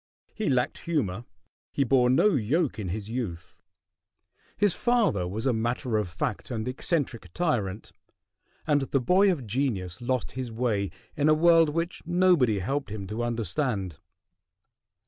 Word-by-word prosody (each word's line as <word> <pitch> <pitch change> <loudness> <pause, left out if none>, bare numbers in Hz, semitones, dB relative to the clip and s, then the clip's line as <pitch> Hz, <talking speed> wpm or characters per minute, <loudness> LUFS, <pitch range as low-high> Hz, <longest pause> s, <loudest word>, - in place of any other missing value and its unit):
He 215 -6 -2
lacked 125 -2 0
humor, 120 - -1 0.5
he 140 - +1
bore 125 -1 +3
no 130 +11 +5
yoke 140 - 0
in 100 - -3
his 105 +4 -5
youth, 90 -8 -5 1.0
his 205 -3 +3
father 220 - +1
was 105 +6 -4
a 130 - +3
matter 120 +1 -1
of 105 -4 -1
fact 115 - -3
and 115 -2 -3
eccentric 125 - -2
tyrant, 115 - -1 0.7
and 145 -1 +2
the 135 +1 0
boy 190 +10 +4
of 145 -9 -3
genius 105 -5 -2
lost 125 0 -1
his 130 -2 -5
way 110 -4 0 0.3
in 150 +1 +2
a 155 - +6
world 165 0 +5
which 165 +3 -3
nobody 175 - +3
helped 135 +9 -2
him 105 -2 -5
to 105 +4 -4
understand. 115 - -2
125 Hz, 145 wpm, -27 LUFS, 105-150 Hz, 1.0 s, a